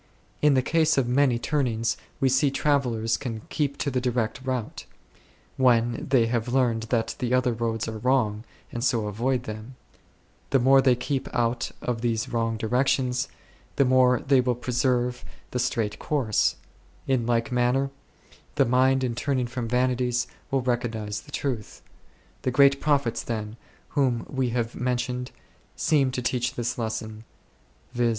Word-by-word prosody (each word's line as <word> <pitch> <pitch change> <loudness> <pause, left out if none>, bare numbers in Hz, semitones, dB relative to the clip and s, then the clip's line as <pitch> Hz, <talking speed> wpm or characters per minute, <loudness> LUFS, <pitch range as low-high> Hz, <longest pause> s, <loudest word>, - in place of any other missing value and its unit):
In 150 -2 +5
the 130 - +3
case 160 +1 +2
of 130 -3 +2
many 125 -1 +3
turnings 120 -3 0 0.2
we 135 - +3
see 130 +2 +3
travellers 125 -6 +1
can 115 -5 -5
keep 140 -2 -1
to 140 - -1
the 125 -1 0
direct 125 0 -1
route, 130 -4 -4 0.7
when 120 -2 +2
they 130 -4 +4
have 115 0 -1
learnt 120 -3 +1
that 115 -2 0
the 125 0 +1
other 125 -1 +2
roads 115 -1 -2
are 110 -1 -5
wrong, 110 -4 +1 0.3
and 120 - -4
so 120 -5 +1
avoid 120 +5 -1
them; 110 +3 -8 0.7
the 135 - +4
more 135 +2 +5
they 130 -2 +4
keep 130 +2 -3
out 120 0 0
of 120 -2 -2
these 115 -2 -1
wrong 115 -1 -1
directions, 125 +2 +1 0.5
the 140 - +3
more 125 -1 +4
they 135 -2 +4
will 125 -1 0
pre 125 +1 -5
serve 125 0 +1 0.3
the 125 - -2
straight 115 -4 -1
course; 130 -8 +1 0.5
in 125 -3 0
like 115 0 +1
manner 125 +3 +1 0.6
the - - +4
mind 130 +2 +3
in 125 -2 0
turning 130 +1 -1
from 120 0 -4
vanities 125 0 +1 0.2
will 135 -1 +1
recognize 115 -4 -2
the - - -16
truth. 120 -7 -4 0.6
The - - 0
great 140 +2 +4
prophets, 140 -6 +1
then, 110 -2 -4 0.3
whom 130 -5 0
we 130 -2 -1
have 115 -1 -2
mentioned 125 0 -2 0.5
seem 145 -5 +2
to 125 -1 -4
teach 125 -1 -1
this 120 0 -2
lesson, 110 -1 -4 0.7
viz. 120 -1 +2
125 Hz, 160 wpm, -26 LUFS, 115-130 Hz, 0.7 s, In